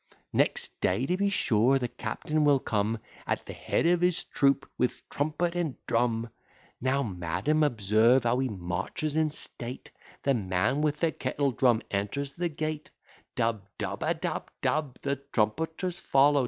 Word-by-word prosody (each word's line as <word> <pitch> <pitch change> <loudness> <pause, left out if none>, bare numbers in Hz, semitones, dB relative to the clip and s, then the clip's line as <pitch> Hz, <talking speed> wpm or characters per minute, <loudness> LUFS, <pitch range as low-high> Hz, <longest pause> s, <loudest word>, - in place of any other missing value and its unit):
Next - - +1
day 95 +8 +2
to 180 - +1
be 200 +2 +1
sure, 125 - +3
the 125 -2 -1
captain 150 +7 -2
will 145 -2 +5
come, 110 -1 0 0.3
At - - -1
the - - -7
head - - 0
of 175 0 +4
his 180 -1 +2
troop, 140 -1 +2
with 125 - -1
trumpet 155 +4 0
and 165 -6 -1
drum. 115 -1 +1 0.5
Now, 130 +2 +2
madam, 90 - 0
observe 115 -1 +4
how 120 +1 +2
he 130 -1 0
marches 105 - -3
in 155 -1 +3
state: 125 -4 -7 0.3
The 140 - +3
man 105 +5 +1
with 150 -1 0
the 165 -2 +3
kettle 140 0 -1
drum 120 -2 +3
enters 105 +8 -2
the 175 0 -1
gate: 155 0 -4 0.5
Dub, 115 -3 0
dub, - - -3
adub, - - -1 0.2
dub. 150 -4 0
The 140 0 0
trumpeters 160 - -1
follow. 140 +1 +4
135 Hz, 155 wpm, -29 LUFS, 115-155 Hz, 0.5 s, will